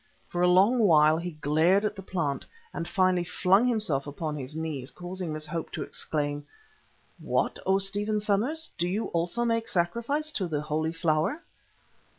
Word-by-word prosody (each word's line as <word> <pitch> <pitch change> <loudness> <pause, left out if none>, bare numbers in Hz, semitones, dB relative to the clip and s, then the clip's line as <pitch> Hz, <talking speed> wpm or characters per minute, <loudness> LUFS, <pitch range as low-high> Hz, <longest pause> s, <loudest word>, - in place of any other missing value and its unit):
For 175 - -2
a 180 - +5
long 195 +8 +5
while 155 -7 +5
he 175 +2 -3
glared 165 +8 +3
at 210 0 -1
the 195 - -7
plant, 165 -7 -2 0.3
and 170 - -4
finally 185 -2 +2
flung 190 +6 +3
himself 210 - 0
upon 150 +1 -4
his 140 +1 -6
knees, 155 -5 -3
causing 180 0 -5
Miss 155 0 -3
Hope 165 +1 -4
to - - -3
exclaim: 145 -1 -2 0.8
"What, - - -1
O 190 0 +4
Stephen 205 +2 0
Somers! 225 +11 0
do 175 - +1
you 210 +5 -2
also 175 +8 -1
make 230 -1 0
sacrifice 235 - 0
to 200 -11 -2
the 150 -3 -2
Holy 155 +1 -1
Flower?" 165 - 0
180 Hz, 165 wpm, -28 LUFS, 155-210 Hz, 0.8 s, a